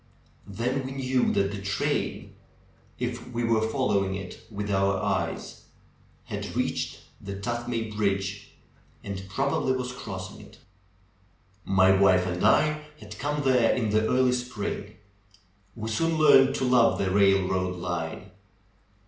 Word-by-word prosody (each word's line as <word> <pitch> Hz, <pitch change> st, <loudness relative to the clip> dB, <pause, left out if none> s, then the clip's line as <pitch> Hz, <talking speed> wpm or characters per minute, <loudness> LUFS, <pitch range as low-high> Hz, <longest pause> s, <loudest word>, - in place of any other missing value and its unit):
Then 125 Hz, +7 st, -2 dB
we 130 Hz, +1 st, -5 dB
knew 130 Hz, -2 st, +1 dB
that 100 Hz, 0 st, +1 dB
the 100 Hz, -1 st, -6 dB
train, 100 Hz, +1 st, -2 dB, 0.6 s
if -, -, -4 dB
we 120 Hz, 0 st, -2 dB
were 115 Hz, -1 st, +2 dB
following 110 Hz, -5 st, 0 dB
it 95 Hz, -1 st, -8 dB
with 105 Hz, -1 st, -4 dB
our 95 Hz, 0 st, +2 dB
eyes, -, -, -3 dB, 0.6 s
had -, -, -6 dB
reached -, -, -2 dB, 0.2 s
the 100 Hz, 0 st, -6 dB
Tuthmay 115 Hz, +1 st, -3 dB
bridge, 100 Hz, -1 st, -1 dB, 0.5 s
and 95 Hz, -1 st, -5 dB
prob 140 Hz, +9 st, 0 dB
ably 130 Hz, -, +1 dB
was 125 Hz, -1 st, -3 dB
crossing 95 Hz, -6 st, -7 dB
it. -, -, -16 dB, 1.1 s
My 95 Hz, 0 st, +4 dB
wife 95 Hz, -2 st, +4 dB
and 90 Hz, 0 st, -3 dB
I 155 Hz, 0 st, +3 dB
had 105 Hz, -3 st, -11 dB
come 145 Hz, 0 st, -1 dB
there 125 Hz, -4 st, +3 dB
in 110 Hz, -4 st, -1 dB
the 110 Hz, +1 st, +2 dB
early 130 Hz, 0 st, +3 dB
spring. 125 Hz, -4 st, -4 dB, 0.8 s
We 110 Hz, -1 st, -5 dB
soon 165 Hz, +8 st, 0 dB
learned 145 Hz, -3 st, +6 dB
to -, -, -2 dB
love 125 Hz, -2 st, +4 dB
the 95 Hz, -1 st, 0 dB
railroad 95 Hz, -2 st, +2 dB
line. 90 Hz, +1 st, -4 dB
105 Hz, 140 wpm, -27 LUFS, 95-125 Hz, 1.1 s, learned